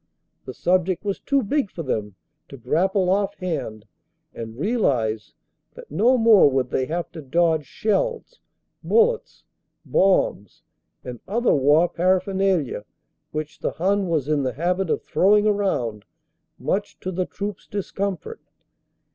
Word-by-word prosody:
The 130 - -7
sub 180 0 +2
ject 185 +1 -3
was 200 -1 -2
too 280 -2 +1
big 270 +1 0
for 165 - -6
them 105 -7 -3 0.3
to 140 - -10
grapple 185 - +1
offhand 180 - -2 0.5
and 115 0 -8
realize 130 - 0 0.4
that - - -13
no 250 +4 +3
more 225 -9 +6
would 130 -2 -1
they 130 - 0
have 170 +1 -3
to 165 -2 -8
dodge 160 +1 +1
shells, 485 - -2 0.4
bullets, 465 +1 +1 0.4
bombs 185 - +1 0.4
and 125 -2 -7
other 235 +5 +2
war 145 +5 +4
paraphernalia 185 - 0 0.5
which 155 0 -5
the - - -2
Hun 195 +3 0
was 155 -5 0
in 150 -2 +1
the 130 -2 -2
habit 180 +3 -1
of - - -1
throwing 205 +2 +3
around 190 - 0 0.5
much 195 +10 -2
to 185 - -3
the 185 0 -2
troops 205 -1 -6
discomfort. 200 - -4
180 Hz, 135 wpm, -23 LUFS, 145-205 Hz, 0.5 s, more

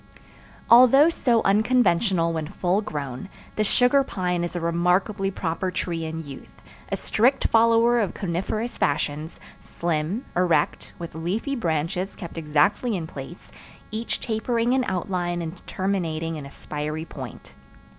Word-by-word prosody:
Although 255 +6 +7
so 240 -8 +2
unconventional 195 -5 +3
when 160 -2 -3
full 185 +2 0
grown, 145 - -5 0.3
the 215 - +1
sugar 250 +6 +4
pine 180 -7 -2
is 175 - -4
a - - -1
remarkably 180 +4 +1
proper 185 -1 -2
tree 170 -2 -3
in 160 0 -5
youth—a 140 -2 -9
strict 255 +5 +2
follower 230 +1 +4
of 205 -5 -1
coniferous 195 +6 -3
fashions—slim, 155 - -2
erect, 175 -1 +1
with 170 -1 -7
leafy 190 - -2
branches 170 - -2
kept 170 -2 -7
exactly 160 +10 +2
in 165 - -4
place, 150 +2 -10 0.4
each 220 +2 -3
tapering 230 +2 0
in 260 -1 +2
outline 180 -2 -2
and 165 +3 -7
terminating 165 -4 -2
in 145 -3 -7
a - - -10
spiry 150 +2 -5
point. 130 - -9
180 Hz, 130 wpm, -24 LUFS, 160-220 Hz, 0.4 s, Although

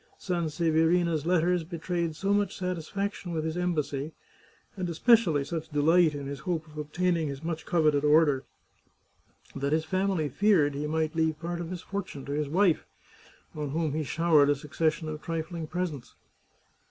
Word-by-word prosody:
Sanseverina's 165 -1 +1
letters 180 0 +2
betrayed 170 -1 -3
so 195 +5 0
much 205 -2 0
satisfaction 185 +1 -3
with 160 -1 -2
his 160 0 -2
embassy, 155 -4 -2 0.6
and 185 -3 -3
especially 170 - +4
such 160 +2 -5
de 150 -2 -1
light 160 +1 +4
in 140 -1 -5
his 140 0 -5
hope 160 +1 -2
of 155 -1 -17
obtaining 160 +2 0
his 140 +1 -6
much 160 -1 -4
coveted 150 -4 +2
order, 150 -3 +4 1.1
that 140 +1 -1
his 160 0 +1
family 185 -2 0
feared 160 -2 +3
he 145 +2 -3
might 155 0 -1
leave 160 -2 0
part 170 0 -4
of 165 - -5
his 180 -1 -5
fortune 190 -8 -5
to 140 - -6
his 145 0 -1
wife, 180 +1 +3 0.7
on 150 -2 -4
whom 155 0 -1
he 155 +1 -1
showered 155 -1 +3
a 145 - +4
succession 155 +3 -1
of 155 0 -5
trifling 165 -1 -4
pres 180 +1 -2
ents. 140 -5 -11
160 Hz, 165 wpm, -28 LUFS, 150-175 Hz, 1.1 s, especially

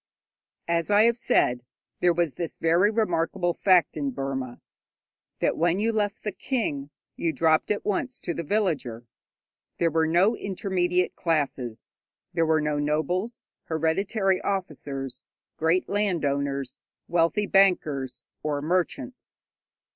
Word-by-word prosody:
_ - - -68 0.6
As 170 +1 0
I 205 +1 +6
have 235 0 +4
said, 125 - +1 0.4
there 180 - +4
was 170 -3 0
this 170 -2 -4
very 170 +5 +3
remarkable 175 -5 0
fact 185 -2 +3
in 145 -3 -1
Burma 135 -1 -4 0.8
that - - +2
when 175 +3 +1
you 225 +2 +1
left 210 -1 -1
the 210 - -2
king, 165 - -2 0.3
you 165 - 0
dropped 160 -1 +2
at 210 - -1
once 245 +5 -2
to 170 - -3
the 170 - -3
villager. 150 - -1 0.7
There 165 -1 +2
were 160 +1 +2
no 180 +8 +3
intermediate 180 -3 -1
classes. 140 -8 -2 0.4
There 165 -2 +2
were 160 -1 +3
no 150 -1 0
nobles, 175 +10 -1 0.2
hereditary 190 +5 0
officers, 140 -9 -4 0.3
great 165 +3 +2
landowners, 140 -9 -1 0.3
wealthy 175 +5 +2
bankers 145 -11 +2 0.2
or 150 -1 -1
merchants. 185 - -2
170 Hz, 130 wpm, -26 LUFS, 145-195 Hz, 0.8 s, I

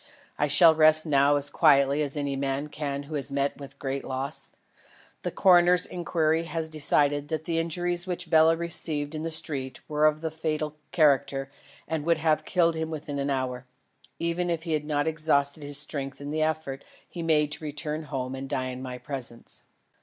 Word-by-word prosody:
I 145 - 0
shall 160 +3 +7
rest 155 0 +7
now 145 -1 +3
as 145 0 +1
quietly 140 -2 +4
as 145 0 -2
any 140 -1 -2
man 135 +2 -2
can 145 -2 -4
who 150 +2 -10
has 140 -1 -3
met 140 +1 -1
with 140 -1 -9
a - - -34
great 135 0 -4
loss. 135 +3 -3 0.7
The - - -2
coroner's 180 -1 +5
inquiry 165 -2 0
has 165 -1 -3
decided 145 -1 +1
that 155 0 -3
the 165 -1 -1
injuries 175 +2 -2
which 180 -1 -4
Bela 160 0 +5
received 160 -3 -1
in 155 - -4
the 165 - -3
street 140 -4 -2
were 150 0 +3
of 155 +1 -1
a 160 - -2
fatal 155 -1 -3 0.2
character 140 -3 +2 0.4
and 160 -2 -2
would 165 +1 +2
have 155 -1 +1
killed 170 -2 +2
him 160 0 -3
within 150 -2 -5
an 140 +1 -1
hour, 130 -2 -3 0.5
even 170 +1 -1
if 165 -1 -2
he 165 -2 -2
had 150 -1 -1
not 150 0 0
exhausted 155 -2 +1
his 145 -1 -1
strength 140 -2 -2
in 145 +1 -6
the 155 +1 -1
effort 155 -3 -2 0.2
he 175 - -7
made 150 -2 +2
to 150 - -2
return 150 +1 -3
to 160 - -9
his - - -17
home 130 -2 -3
and 135 0 -6
die 130 0 -2
in 125 0 -7
my 125 -1 -6
presence. 125 -2 -5
150 Hz, 200 wpm, -27 LUFS, 140-160 Hz, 0.7 s, shall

